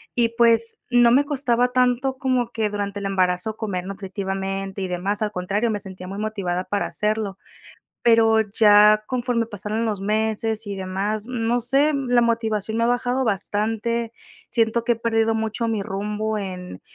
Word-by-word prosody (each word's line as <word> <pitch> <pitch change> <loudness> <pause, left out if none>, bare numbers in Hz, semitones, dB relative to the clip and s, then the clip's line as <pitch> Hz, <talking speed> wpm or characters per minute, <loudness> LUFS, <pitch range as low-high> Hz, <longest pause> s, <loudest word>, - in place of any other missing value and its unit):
y, 235 -1 +3
pues, 230 -1 +2
no 240 -1 +5
me 280 +3 +4
costaba 250 -3 0
tanto 255 +1 +1
como 255 -3 0
que 220 -3 -1
durante 205 -1 -3
el 195 - -2
embarazo 185 +2 0
comer 185 -5 -3
nutritivamente 195 0 -4
y 190 - -2
demás, 190 +4 -2
al 210 - 0
contrario, 200 +6 -1
me 210 - -1
sentía 190 -2 -9
muy 195 +2 -6
motivada 195 -4 -2
para 205 +1 -1
hacerlo. 210 -2 -2 0.7
Pero 225 -1 +5
ya 210 0 +5
conforme 245 -2 -1
pasaron 215 +1 -3
los 210 -3 -2
meses 220 +1 0
y 200 - -4
demás, 195 +3 -2
no 240 -1 0
sé, 270 +5 +2
la 250 -3 +2
motivación 225 -2 0
me 230 - +2
ha - - +2
bajado 245 +2 0
bastante. 225 +3 -1 0.4
Siento 230 0 +1
que 240 - +3
he - - -8
perdido 225 -1 +1
mucho 220 +1 -2
mi 220 -2 -1
rumbo 210 +2 -3
en 180 - -6
220 Hz, 165 wpm, -23 LUFS, 200-235 Hz, 0.7 s, no